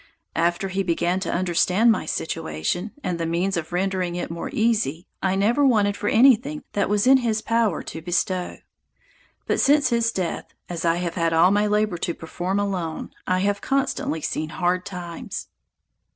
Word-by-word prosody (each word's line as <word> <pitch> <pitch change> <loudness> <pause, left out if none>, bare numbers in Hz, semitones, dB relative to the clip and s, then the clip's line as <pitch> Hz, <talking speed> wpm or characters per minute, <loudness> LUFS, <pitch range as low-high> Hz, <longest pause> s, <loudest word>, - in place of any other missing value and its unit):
After 175 +3 +1
he 190 +1 -1
began 175 0 0
to 185 - -3
understand 185 +5 +3
my 215 - -1
situation, 155 - -2
and 180 -2 -2
the 165 - -1
means 175 +4 0
of 165 -1 -4
rendering 180 -1 -1
it 175 - -4
more 165 - -5
easy, 215 -8 0 0.2
I 190 0 +1
never 225 +9 +2
wanted 210 -6 +3
for 205 - -2
anything 270 +4 +4
that 200 -2 0
was 205 +1 +2
in 265 +1 +7
his 225 -4 -1
power 230 -6 +1
to 160 - -7
bestow; 180 +2 -1 0.9
but - - 0
since 290 +1 +4
his 230 -1 +2
death, 185 -6 -4
as 170 -1 -4
I 165 0 +3
have 175 -1 -2
had 165 -1 0
all 165 +3 +5
my 205 +1 +2
labor 210 -4 +1
to 170 - -2
perform 180 +4 -3
alone, 185 -6 -3 0.2
I 185 0 +1
have 200 +1 0
constantly 270 - -1
seen 155 +1 -2
hard 180 +3 -1
times. 175 -3 -6
185 Hz, 175 wpm, -23 LUFS, 170-210 Hz, 0.9 s, in